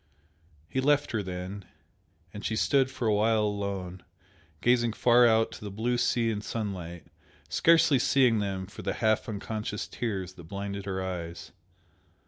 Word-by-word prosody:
He 130 - -1
left 145 +1 +2
her 110 - 0
then, 95 +1 -6 0.7
and 105 - -8
she 110 - -1
stood 135 +3 +3
for 130 -3 -3
a 110 - +3
while 110 +1 +3
alone, 100 -3 -3 0.6
gazing 120 -2 +2
far 120 +1 +5
out 110 0 +3
to - - -10
the 105 - -5
blue 120 +5 -1
sea 115 -2 +2
and 105 -1 -4
sunlight, 90 -8 -5 0.4
scarcely 165 -4 +4
seeing 125 -3 +3
them 95 -2 -2
for 100 - -10
the - - -2
half 110 0 +1
unconscious 105 0 -4
tears 95 -6 -4
that 85 -3 -13
blinded 100 +2 -5
her 95 -1 -2
eyes. 85 -2 -6
105 Hz, 155 wpm, -28 LUFS, 95-120 Hz, 0.7 s, far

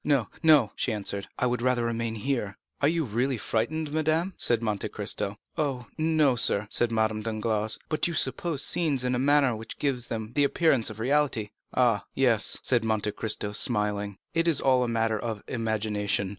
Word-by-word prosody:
"No, 135 -7 +1
no," 150 -9 +5
she - - -1
answered, 100 -1 -3
"I - - 0
would 125 -1 0
rather 125 -1 +1
remain 115 -1 -2
here." 110 -4 -2 0.2
"Are 140 - +4
you 165 0 +1
really 125 +3 -1
frightened, 145 +9 -2
madame?" 160 +4 0
said 115 -1 +1
Monte 105 -3 -2
Cristo. - - -2 0.2
"Oh, 135 -5 -1
no, 155 -4 +2
sir," 105 -3 +2
said 120 -1 +1
Madame 110 -1 0
Danglars; 110 0 -1
"but 155 +2 0
you 170 - -4
suppose 145 +2 +1
scenes 150 -7 +2
in 125 0 0
a 125 - 0
manner 140 -2 +3
which 110 +1 -8
gives 130 -4 -1
them 110 -1 -5
the 145 - +3
appearance 140 -4 +2
of 110 0 -9
reality." 130 -4 0 0.2
30223m - - -18
"Ah, 120 -5 +3
yes," 120 -5 +2
said 120 -3 +2
Monte 110 -1 0
Cristo 105 -1 -1
smiling; 105 -2 0 0.2
"it 165 0 +1
is 160 -5 +4
all 130 -1 +3
a - - -1
matter 115 -2 0
of 110 -3 -5
imagination. 105 -4 -1
120 Hz, 185 wpm, -27 LUFS, 110-140 Hz, 0.2 s, no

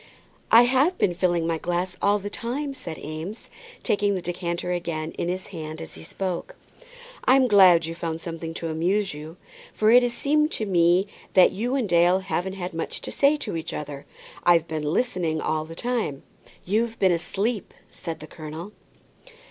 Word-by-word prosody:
"I 230 +2 +9
have 265 +9 +3
been 180 - +2
filling 175 -1 +1
my 165 -1 -1
glass 175 +2 -2
all 205 +1 +3
the 205 0 -6
time," 275 +6 -3
said 165 -11 -7
Eames, 160 +8 -7 0.3
taking 205 -1 +1
the 185 - -3
decanter 175 0 -3
again 170 -3 -3
in 170 - -3
his 185 +1 -3
hand 155 -2 -6
as 80 - -9
he 80 - -11
spoke. 185 - -4 0.7
"I'm 260 0 +5
glad 185 -6 +7
you've 165 +1 -6
found 165 -1 -3
something 165 -1 -6
to 165 - -4
amuse 185 +5 0
you, 155 +3 -9 0.4
for 215 +1 +4
it 245 +1 +8
has 245 -1 0
seemed 300 +2 +2
to 215 - -2
me 175 0 +3 0.3
that 185 - +7
you 240 +6 -2
and 255 -6 0
Dale 175 +1 +4
haven't 190 0 -2
had 185 -2 -5
much 165 - -4
to - - -6
say 285 +2 +3
to 290 - -5
each 160 - -4
other. 145 -2 -6 0.4
I've 170 -2 +4
been 155 -1 -3
listening 175 -7 0
all 155 0 -1
the 165 +1 -10
time." 230 - -2 0.4
"You've 225 +4 0
been 190 -2 +4
asleep," 200 +5 -1 0.2
said 165 -2 -7
the - - -7
colonel. 160 +5 -8
180 Hz, 180 wpm, -25 LUFS, 165-210 Hz, 0.7 s, I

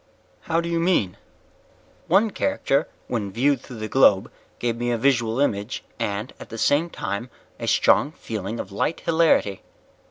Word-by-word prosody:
"How 165 +1 +2
do 170 - -5
you 170 0 0
mean?" 165 - +1 0.9
"One 205 +5 +4
character 185 - 0 0.2
when 105 -5 -2
viewed 135 +6 +2
through 125 - -10
the 110 0 -4
globe 110 -4 +4 0.3
gave 120 -1 -1
me 120 +1 -2
a 120 - +1
visual 120 -2 +1
image 105 -4 -1 0.2
and, 105 +3 -3
at - - -10
the 115 - -7
same 145 +8 +2
time, 100 -3 -4 0.3
a - - -4
strong 145 - +4
feeling 110 - -5
of 95 - -6
light 150 +11 -1
hilarity." 160 - +2
120 Hz, 160 wpm, -24 LUFS, 105-160 Hz, 0.9 s, One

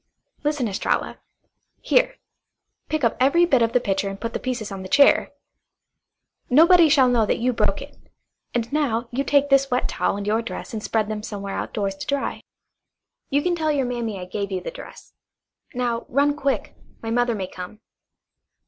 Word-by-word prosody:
"Listen, 295 -5 0
Estralla! 195 - -2 0.6
Here, - - +2 0.7
pick 310 -2 -1
up 230 - +2
every 280 +7 +4
bit 270 -8 +3
of 230 0 +2
the 250 - +3
pitcher 195 -3 -1
and 195 0 -7
put 230 0 -4
the - - -2
pieces 240 -5 -4
on 195 -1 -6
the 185 - -8
chair. 280 +6 +5 1.2
Nobody 330 +4 +6
shall 275 -3 +5
know 240 -2 +3
that - - +1
you 245 +2 0
broke - - 0
it. - - -14 0.6
And 235 +2 -2
now 240 -6 0
you 265 +3 -1
take 285 0 +2
this 275 0 +4
wet 250 0 0
towel - - -1
and 200 - -5
your 215 +2 +1
dress 235 - -7
and 220 - -3
spread 215 -1 0
them 215 -1 -4
somewhere 200 -2 -6
outdoors 200 -3 -2
to - - -7
dry. 280 -1 -2 0.9
You 285 +1 +1
can 355 -1 +1
tell 315 -2 0
your 280 -3 0
mammy 235 -5 -3
I 180 - -6
gave 200 +2 -4
you 190 - -1
the - - -6
dress. - - -12 0.6
Now, 240 -2 -2
run 285 +2 +2
quick. 280 -2 -2 0.3
My 225 - -3
mother 240 0 +1
may 195 -3 -3
come." 185 +4 -9
245 Hz, 185 wpm, -23 LUFS, 215-280 Hz, 1.2 s, Nobody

